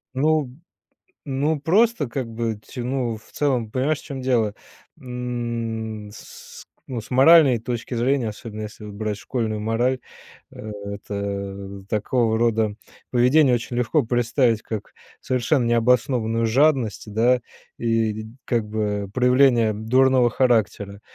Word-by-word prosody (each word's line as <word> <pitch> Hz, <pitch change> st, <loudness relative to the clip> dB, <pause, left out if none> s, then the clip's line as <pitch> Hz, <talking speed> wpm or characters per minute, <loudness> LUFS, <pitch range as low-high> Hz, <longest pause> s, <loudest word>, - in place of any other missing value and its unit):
Ну 150 Hz, -2 st, +1 dB, 0.8 s
ну, 145 Hz, +3 st, 0 dB
просто, 190 Hz, -, +2 dB
как 125 Hz, 0 st, -3 dB
бы, 115 Hz, -1 st, -3 dB
ть -, -, -12 dB
ну, 125 Hz, -2 st, -2 dB
в 110 Hz, -, -21 dB
целом 125 Hz, -7 st, 0 dB
понимаешь, 140 Hz, +4 st, 0 dB
в -, -, -18 dB
чем 135 Hz, -3 st, -6 dB
дело, 115 Hz, -5 st, +1 dB, 0.4 s
м, 120 Hz, -3 st, -4 dB
с 105 Hz, -, -12 dB
с -, -, -19 dB, 0.2 s
ну, 125 Hz, -3 st, -4 dB
с 110 Hz, -, -14 dB
моральной 135 Hz, -1 st, +7 dB
точки 120 Hz, +1 st, -4 dB
зрения, 125 Hz, 0 st, +1 dB
особенно 110 Hz, 0 st, -8 dB
если 105 Hz, 0 st, -8 dB
вот 105 Hz, -, -8 dB
брать 105 Hz, 0 st, -3 dB
школьную 110 Hz, 0 st, -3 dB
мораль, 120 Hz, +4 st, 0 dB, 0.5 s
э, 110 Hz, -, -8 dB
это 100 Hz, -1 st, -5 dB
такого 110 Hz, +2 st, +1 dB
рода 110 Hz, -2 st, +1 dB, 0.4 s
поведение 125 Hz, +2 st, +4 dB
очень 120 Hz, 0 st, -3 dB
легко 125 Hz, +5 st, +2 dB
представить, 120 Hz, -1 st, +1 dB
как 110 Hz, -3 st, -6 dB, 0.3 s
совершенно 130 Hz, +1 st, +1 dB
необоснованную 115 Hz, -1 st, +2 dB
жадность, 125 Hz, -4 st, +1 dB
да, 120 Hz, +3 st, +3 dB, 0.4 s
и, 110 Hz, -2 st, 0 dB, 0.2 s
как 115 Hz, -3 st, 0 dB
бы, 105 Hz, -2 st, -2 dB
проявление 125 Hz, -3 st, +4 dB
дурного 125 Hz, +3 st, +3 dB
характера, 110 Hz, -5 st, 0 dB
120 Hz, 130 wpm, -23 LUFS, 110-130 Hz, 0.8 s, моральной